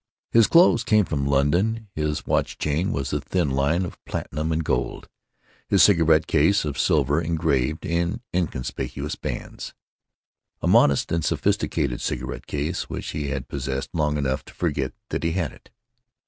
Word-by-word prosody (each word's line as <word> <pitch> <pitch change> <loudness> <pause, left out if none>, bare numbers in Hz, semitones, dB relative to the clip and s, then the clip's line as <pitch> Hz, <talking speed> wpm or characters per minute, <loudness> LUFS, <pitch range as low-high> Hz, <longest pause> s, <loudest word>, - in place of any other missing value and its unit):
His 115 -2 +6
clothes 170 -8 +5
came 105 -2 +3
from 70 -4 -2
London, 90 +12 +1
his 75 -1 -2
watch - - 0
chain 75 +5 0
was 70 -2 -3
a - - 0
thin 70 - -1
line 70 +7 +1
of - - -10
platinum 75 +4 -3
and 80 +1 0
gold, 65 -5 -2 0.6
his - - +5
cigarette 80 -5 +5
case 80 +5 +3
of 70 -2 -4
silver 75 +1 +2
engraved 80 -3 0
in 85 +5 -1
inconspicuous 75 -3 -3
bands—a - - -9
modest 70 - +4
and 85 -1 0
sophisticated 60 -4 0
cigarette - - -4
case, 75 +5 -3
which - - -5
he 75 -2 -3
had 65 -1 -3
possessed 70 0 -4
long 75 -3 0
enough 65 -2 -1
to - - -15
forget 70 -6 -1 0.2
that - - -2
he 80 0 0
had 85 -8 -1
it. - - -18
75 Hz, 155 wpm, -24 LUFS, 70-85 Hz, 0.6 s, His